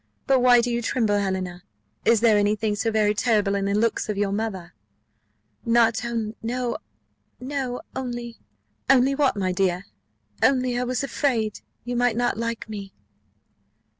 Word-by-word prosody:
But 270 -1 +4
why 245 -1 +6
do 240 +1 -1
you 235 0 -1
tremble, 220 -3 +1
Helena? 185 -2 -3 0.4
Is 230 -2 +4
there 230 -2 +5
any 205 +1 +3
thing 215 -1 -1
so 215 +2 0
very 215 -1 +2
terrible 210 -2 +1
in 200 -1 0
the 200 0 0
looks 225 +1 0
of 210 - -2
your 200 -1 0
mother?" 195 -5 -4 0.9
"No, 230 +1 0 1.2
only 240 -2 -5 0.2
" 105 - -40
"Only 260 +2 +3
what, 280 -4 +2
my 185 -2 0
dear?" 180 0 0 0.6
"Only 255 -2 +2
I 250 - -1
was 250 +1 -1
afraid 240 -6 -1 0.2
you 245 +1 -4
might 245 -1 +2
not 245 0 +1
like 230 +1 -3
me." 200 -3 -7
225 Hz, 150 wpm, -24 LUFS, 205-245 Hz, 1.2 s, why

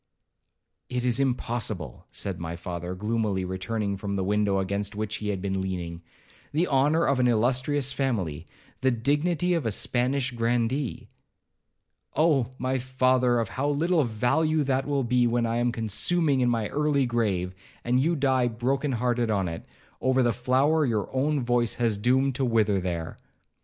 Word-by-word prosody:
'It 125 0 -2
is 120 0 +2
impossible,' 115 - -2
said 95 -3 -5
my 85 0 -4
father, 90 +1 -5
gloomily 105 -2 -1
returning 100 +3 -2
from 100 +1 -4
the 95 - -1
window 105 0 +1
against 100 +2 -2
which 105 0 -3
he 105 - -5
had 95 -2 -3
been 95 -1 -1
leaning; 85 -3 -4 0.5
'the 165 +4 +2
honour 145 +4 +3
of 135 -1 +2
an 125 - +4
illustrious 130 +4 +1
family,—the 105 - -3
dignity 150 +8 +1
of 165 -4 0
a 115 - 0
Spanish 125 +5 0
grandee—' 120 +2 -1 1.1
'Oh! 145 -6 +3
my 130 +1 -1
father, 130 -1 +2
of 115 - -1
how 140 +3 -1
little 160 +3 +2
value 135 +7 +1
will - - -5
that 135 0 0
be, 125 0 +3
when 120 0 +1
I 115 0 -1
am 120 0 +1
consuming 135 - 0
in 125 -1 +3
my 115 -3 0
early 145 -2 +1
grave, 100 -7 -1 0.3
and 125 +1 +2
you 165 +6 +2
die 130 -4 +2
broken 130 +4 -1
hearted 120 -1 0
on 100 -4 +1
it, 80 0 -6 0.3
over 130 0 +3
the 120 -1 +2
flower 135 +6 +2
your 110 -6 -1
own 140 +1 +1
voice 120 -2 +1
has 115 -3 +1
doomed 130 +6 +2
to 135 - 0
wither 110 -5 +2
there.' 85 -3 -4
120 Hz, 160 wpm, -26 LUFS, 105-135 Hz, 1.1 s, an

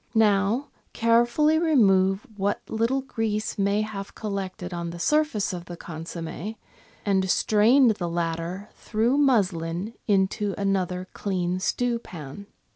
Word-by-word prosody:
Now 215 +4 +3 0.2
carefully 240 +7 +3
remove 195 - +3
what 200 0 -2
little 230 +5 0
grease 220 -5 -2
may 200 +1 +2
have 200 -2 -7
col 215 -2 -5
lected 190 -2 -4
on 170 -1 -3
the 170 - -7
surface 300 - +1
of 175 -1 -6
the 175 0 -8
consomm^, 165 +5 -6 0.5
and 190 -2 +1
strain 225 +8 +4
the 195 -6 0
latter 170 +3 -3
through 235 +6 0
muslin 195 - +1
into 200 0 +1
another 185 -2 -1
clean 185 -2 -1
stewpan. 200 - -3
200 Hz, 120 wpm, -25 LUFS, 180-225 Hz, 0.5 s, strain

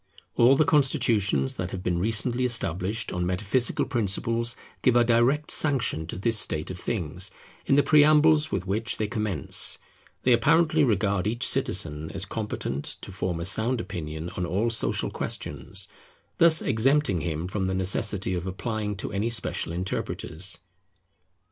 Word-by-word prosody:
All 125 +3 +5
the 155 - +3
constitutions 120 - +2
that 90 -1 -3
have 90 0 -6
been 90 -1 0
recently 115 +5 +1
established 110 -3 -1
on 90 0 -2
metaphysical 100 +7 +1
principles 115 +2 0 0.3
give 125 - +3
a 120 - +5
direct 120 +6 +2
sanction 125 - +2
to - - -6
this 110 +3 +1
state 80 -1 -1
of 90 - -8
things, 95 -2 -3 0.4
in 135 - +4
the 145 - +4
preambles 155 +1 +5
with 95 -2 -2
which 105 +4 -1
they 110 - -1
commence. 105 - +1 0.5
They 125 - +4
apparently 155 +6 +3
regard 100 -5 +1
each 115 +3 0
citizen 75 +1 0
as 95 0 -2
competent 95 -10 -4
to - - -9
form 90 -2 -3
a 85 - -4
sound 115 +6 +2
opinion 80 -5 -6
on 90 - -4
all 100 +7 0
social 115 - -1
questions, - - -4 0.5
thus 165 -1 +5
exempting 130 - +1
him 80 0 -3
from 95 0 -2
the 95 0 -1
necessity 95 +1 0
of 90 0 -3
applying 105 +2 -3
to 95 - -5
any 105 +4 -1
special 115 -7 -2
interpreters. 90 0 -4
105 Hz, 155 wpm, -26 LUFS, 90-120 Hz, 0.5 s, All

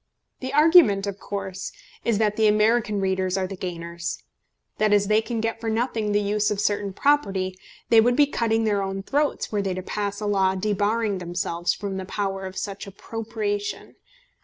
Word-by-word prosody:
The 260 0 -4
argument 300 - +6
of 200 -1 -5
course 195 -1 -5 0.3
is, 230 -3 +1
that 210 -1 +1
the 220 -1 +3
American 215 0 +3
readers 190 -1 0
are 190 - 0
the 195 +1 -6
gainers, 170 -1 -5 0.6
that 215 0 +3
as 205 -1 +4
they 215 +2 +3
can 230 0 -3
get 225 0 -2
for 225 - -2
nothing 220 -2 -1
the 205 - +3
use 210 +1 +1
of 210 - -2
certain 205 -1 0
property, 195 -7 +1 0.3
they 225 -1 +7
would 245 +2 +3
be 290 - +6
cutting 225 -5 0
their 205 -2 +1
own 195 0 -3
throats 290 +6 0
were 205 -2 0
they 190 -2 -2
to 185 - -5
pass 205 +1 -3
a 210 - -4
law 190 -2 +2
debarring 205 +1 0
themselves 175 -1 -2
from 200 -2 -4
the 190 - -4
power 195 -1 -3
of 190 - -9
such 200 0 -5
appropriation. 205 0 -4
205 Hz, 185 wpm, -24 LUFS, 195-220 Hz, 0.6 s, they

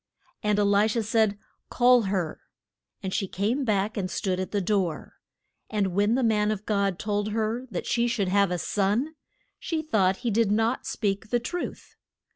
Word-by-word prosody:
And 210 -1 +1
E 205 - +3
li 205 +1 +4
sha 225 +1 0
said, 220 -2 +1 0.3
Call 245 0 +5
her. 180 -5 -2 0.6
And 190 -1 -3
she 195 - 0
came 215 +10 -1
back 215 -1 0
and 185 -2 -2
stood 185 +1 -1
at 185 - -3
the 205 - 0
door. 185 -4 -1 0.5
And 200 -4 0
when 205 +4 +2
the 260 - +1
man 210 -2 +2
of 215 -1 -3
God 200 -3 0
told 205 0 -2
her 225 +3 -1
that 180 - -4
she 240 0 +1
should 220 -5 0
have 200 0 +3
a 180 - -1
son, 210 - 0 0.5
she 320 -2 -2
thought 195 -10 +2
he 235 - +2
did 220 -1 +2
not 225 +4 +1
speak 205 0 -2
the 240 - +2
truth. 345 +9 -6
210 Hz, 185 wpm, -26 LUFS, 195-230 Hz, 0.6 s, Call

